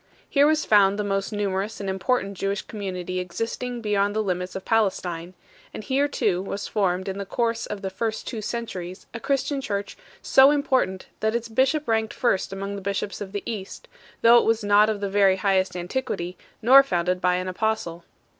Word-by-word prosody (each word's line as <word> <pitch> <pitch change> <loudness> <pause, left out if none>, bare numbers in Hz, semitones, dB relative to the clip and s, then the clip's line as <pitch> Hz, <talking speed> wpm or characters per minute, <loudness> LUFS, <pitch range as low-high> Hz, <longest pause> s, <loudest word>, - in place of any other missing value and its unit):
Here 285 0 +4
was 310 0 +2
found 200 -2 +5
the 210 - -1
most 195 +1 -1
numerous 205 0 -2
and 200 - -5
important 195 +1 -1
Jewish 195 +1 -2
com 215 - -9
munity 185 -2 -3
existing 230 +7 -4
beyond 205 -1 +1
the 215 - +1
limits 180 -2 -3
of 190 - -6
Palestine; 185 -5 0 0.4
and - - -6
here 275 +4 +1
too 180 -10 0
was 195 +1 -5
formed 190 -3 0
in 195 +1 -4
the - - -2
course 230 0 -1
of 210 -1 -6
the 190 - -3
first 220 +2 -3
two 225 -4 -5
centuries 190 -6 -5
a 230 - -5
Christian 275 +2 -1
church 200 -4 -3 0.3
so 265 +1 +7
important 260 -10 +1
that 220 +1 0
its 235 -1 -2
bishop 270 +6 +1
ranked 220 -1 0
first 195 -7 0
among 195 +1 -4
the - - -7
bishops 200 +1 -3
of 195 -2 -6
the 205 0 -4
East, 205 -5 -6 0.4
though 235 +1 +8
it - - +1
was 225 -1 +1
not 205 +1 +5
of 210 -2 -2
the 200 - -1
very 195 -1 +4
highest 190 -1 +1
antiquity, 180 -1 -3 0.3
nor 265 +4 +9
founded 180 -7 -1
by 180 -1 +3
an 185 +1 -2
Apostle. 185 -3 -2
200 Hz, 195 wpm, -24 LUFS, 190-230 Hz, 0.4 s, nor